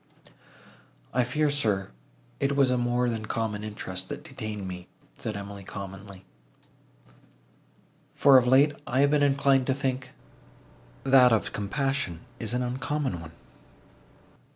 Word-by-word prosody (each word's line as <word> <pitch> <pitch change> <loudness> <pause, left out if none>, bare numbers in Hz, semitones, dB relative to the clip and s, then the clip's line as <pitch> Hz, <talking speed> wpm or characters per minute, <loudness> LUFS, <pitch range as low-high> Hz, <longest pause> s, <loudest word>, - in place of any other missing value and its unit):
"I 125 +1 +3
fear, 150 +5 +1
sir, 105 - 0 0.5
it 140 0 +1
was 135 -2 +4
a - - +3
more 120 +1 +1
than 110 -2 -3
common 110 -2 -2
interest, 95 -3 -5
that - - -6
detained 105 -3 -6
me," 90 -1 -7 0.3
said 105 -2 -5
Emily 100 0 -8
calmly; 95 0 -9 1.9
"for 135 -2 +7
of 125 - -1
late 140 +4 +5
I 130 +2 +2
have 140 0 +4
been 150 -1 +3
inclined 140 -2 +3
to 130 - +2
think, 135 -2 -3 0.9
that 130 -2 +6
of 110 - +1
compassion 105 - -2 0.2
is 115 +1 -2
an 125 - 0
uncommon 130 - -2
one. 80 -1 -11
120 Hz, 130 wpm, -27 LUFS, 100-135 Hz, 1.9 s, for